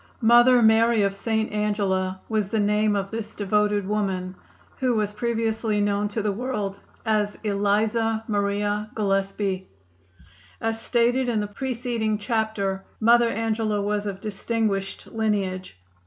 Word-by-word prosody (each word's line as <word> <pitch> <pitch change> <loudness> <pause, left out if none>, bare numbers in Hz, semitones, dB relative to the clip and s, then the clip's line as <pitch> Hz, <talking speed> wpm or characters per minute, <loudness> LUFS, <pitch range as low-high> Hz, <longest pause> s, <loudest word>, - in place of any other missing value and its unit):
"Mother 240 +2 +6
Mary 220 0 +5
of 195 0 +1
St. 220 +2 -1
Angela" 200 -3 0
was 215 -3 0
the 220 +2 -1
name 210 0 +2
of 195 -1 -2
this 225 -1 -5
devoted 205 0 +1
woman, 190 -3 -1 0.5
who 255 -2 +1
was 210 -1 0
previously 225 -1 -1
known 205 0 +1
to 210 +1 -3
the 210 - +1
world 205 -3 -3 0.3
as 210 -2 0
Eliza 215 +2 +1
Maria 205 0 -1
Gillespie. 195 -2 -1 0.9
As 225 0 -2
stated 245 +2 +2
in 225 -3 +1
the 210 - -1
preceding 230 -1 -2
chapter 210 -3 -1 0.2
Mother 235 +1 +5
Angela 220 -2 -1
was 205 +1 -1
of 195 -1 -4
distinguished 210 -2 -2
lineage. 195 - -2
210 Hz, 130 wpm, -24 LUFS, 200-225 Hz, 0.9 s, Mother